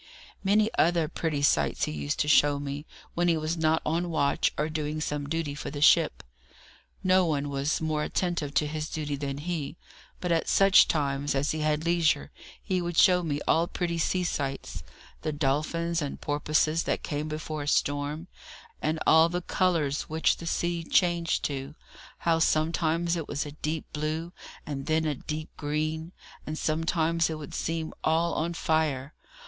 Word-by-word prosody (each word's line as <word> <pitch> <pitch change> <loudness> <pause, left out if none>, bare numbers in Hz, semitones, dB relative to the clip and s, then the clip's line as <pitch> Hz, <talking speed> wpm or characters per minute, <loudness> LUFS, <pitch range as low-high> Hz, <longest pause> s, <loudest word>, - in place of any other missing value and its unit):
Many 210 +3 +3
other 170 -1 +3
pretty 150 -2 -2
sights 75 - +2
he - - 0
used 75 -1 -3
to - - 0
show 145 -1 +5
me, 145 +2 -5 0.3
when 175 +1 +1
he 165 -2 +3
was 155 +2 -1
not 160 -1 +1
on 170 +3 0
watch 145 -4 +1
or 150 - 0
doing 155 -1 -3
some 150 -1 -3
duty 165 -2 -2
for 145 - -6
the 145 - -6
ship. 160 +2 +4 0.8
No 185 0 +4
one 145 -2 -1
was 140 +2 0
more 155 -1 0
attentive 170 -5 -1
to 150 - +3
his 155 +1 -4
duty 150 -2 -3
than 140 -1 -4
he, 160 0 -4 0.4
but 180 - -2
at 165 -1 +1
such 195 -1 +6
times 140 -2 0
as 135 +2 +1
he 155 - -3
had 155 +1 0
leisure 165 -4 +2 0.3
he 185 -3 0
would 175 -1 -4
show 180 -2 +6
me 145 -4 -2
all 165 +1 +3
pretty 170 -2 -2
sea 180 +3 +1
sights: 140 -5 -3 0.4
the 155 - -2
dolphins 155 +4 0
and 145 - -4
porpoises 155 +2 +1
that - - -1
came 150 0 -3
before 155 0 -4
a 145 - -5
storm, 145 +3 0 0.5
and 155 +1 0
all 160 +1 +6
the 175 +1 -3
colours 165 -8 0
which 160 +1 +2
the 170 - -7
sea 170 0 -1
changed 170 0 +1
to 140 +1 -4 0.4
how 165 -1 +1
sometimes 165 +1 +1
it 165 -3 -4
was 145 +1 -2
a 145 - -7
deep 155 +1 -3
blue, 155 +3 -3 0.3
and 135 -2 -5
then 160 0 +2
a 150 - +1
deep 155 +3 -6
green, 155 +2 -2 0.4
and 155 +1 -3
sometimes 165 +1 +1
it 160 - -3
would 150 -2 -9
seem 160 -1 -3
all 165 +2 +2
on 170 +2 -2
fire. 150 -4 0
155 Hz, 175 wpm, -28 LUFS, 145-170 Hz, 0.8 s, such